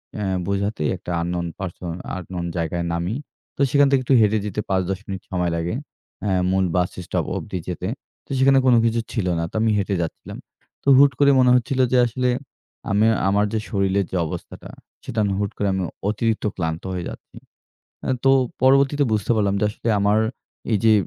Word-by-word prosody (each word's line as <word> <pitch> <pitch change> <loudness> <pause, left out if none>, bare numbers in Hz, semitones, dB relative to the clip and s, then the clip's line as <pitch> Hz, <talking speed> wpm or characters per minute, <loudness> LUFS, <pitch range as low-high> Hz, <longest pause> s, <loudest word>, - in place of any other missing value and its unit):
অ্যা 105 - -3 0.2
বোঝাতেই 100 -5 -1
একটা 90 - -7
unknown 85 0 -2
person 90 -2 -5 0.2
unknown 90 0 -5
জায়গায় 85 +1 -2
নামি। 85 +6 -2 0.4
তো - - -4
সেখান 145 -1 +5
থেকে 135 -2 +3
একটু 130 - +2
হেঁটে 110 0 +3
যেতে 105 +1 -2
৫-১০ 95 0 0
মিনিট 95 -2 -5
সময় 90 -2 0
লাগে। 85 +4 -2 0.5
অ্যা 100 - +1 0.2
'মুন 95 0 +2
বাসস্টপ' 90 0 -1
অব্দি 90 - -5
যেতে। 90 +1 -4 0.4
তো - - -35
সেখানে 135 0 +5
কোনো 120 - +6
কিছু 115 0 +1
ছিল 105 -7 -1
না। 85 - -1
তো - - -17
আমি 110 - +3
হেঁটে 100 0 0
যাচ্ছিলাম। 85 - -6 0.5
তো - - -13
হুট 140 0 +7
করে 140 -1 +6
মনে 125 -1 +5
হচ্ছিলো 130 +2 +1
যে - - +5
আসলে 125 +2 0 0.6
আমি 105 +2 +3 0.2
আমার 100 +1 +3
যে 110 - +1
শরীরের 100 -1 +1
যে 95 - -1
অবস্থাটা - - -8 0.3
সেটা 115 - -8
আমি 100 - 0
হুট 100 -1 -1
করে 100 - 0
আমি 95 - -1 0.3
অতিরিক্ত 110 +1 -1
ক্লান্ত 80 -2 -3
হয়ে 90 - -3
যাচ্ছি। - - -12 0.7
অ্যা 130 - 0
তো 135 - +6 0.3
পরবর্তীতে 140 +2 +4
বুঝতে 105 0 0
পারলাম 100 -2 +1
যে - - +2
আসলে 110 - -5
আমার 105 +2 +3 0.5
এইযে 110 +1 +4
100 Hz, 180 wpm, -22 LUFS, 90-115 Hz, 0.7 s, হুট